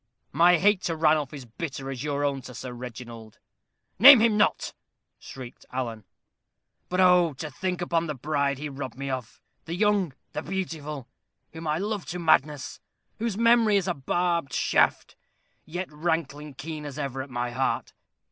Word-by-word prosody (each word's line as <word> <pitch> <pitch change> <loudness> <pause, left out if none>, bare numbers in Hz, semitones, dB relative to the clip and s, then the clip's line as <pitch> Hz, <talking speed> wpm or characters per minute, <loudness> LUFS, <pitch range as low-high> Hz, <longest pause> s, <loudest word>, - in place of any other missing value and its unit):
"My 175 +4 +5
hate 200 +2 +3
to 165 - -1
Ranulph 155 -3 +2
is 140 -4 -8
bitter 135 +2 -6
as 130 0 -5
your 145 -1 -1
own 140 -1 -1
to 125 - -10
Sir 125 0 -6
Reginald." 115 -2 -9 0.6
"Name 270 +3 +11
him 225 -1 +3
not," 210 - +1 0.5
shrieked 130 -2 -10
Alan. 115 -5 -4 0.8
"But, 180 - -1
oh! 180 -3 +5
to 150 +3 -7
think 180 +5 -3
upon 170 -1 0
the 150 - -3
bride 140 +1 -1
he 150 +2 -5
robbed 135 -3 -7
me 140 0 -4
of 130 -4 -5 0.3
the 165 - -4
young 200 -5 +2 0.2
the - - -3
beautiful! 155 -7 -5 0.5
whom 160 0 -7
I 150 +1 +1
loved 205 +1 -3
to 180 - -4
madness; 150 -4 +1 0.4
whose 225 -3 -2
memory 230 -2 +5
is 195 - -1
a 180 - +1
barbed 170 +1 -1
shaft, - - +1 0.5
yet 175 +1 -5
rankling 150 -2 -2
keen 155 +2 -6
as 145 -1 -7
ever 135 -3 -3
at 135 - -8
my 120 -1 -3
heart. 130 +2 -1
150 Hz, 165 wpm, -26 LUFS, 135-180 Hz, 0.8 s, Name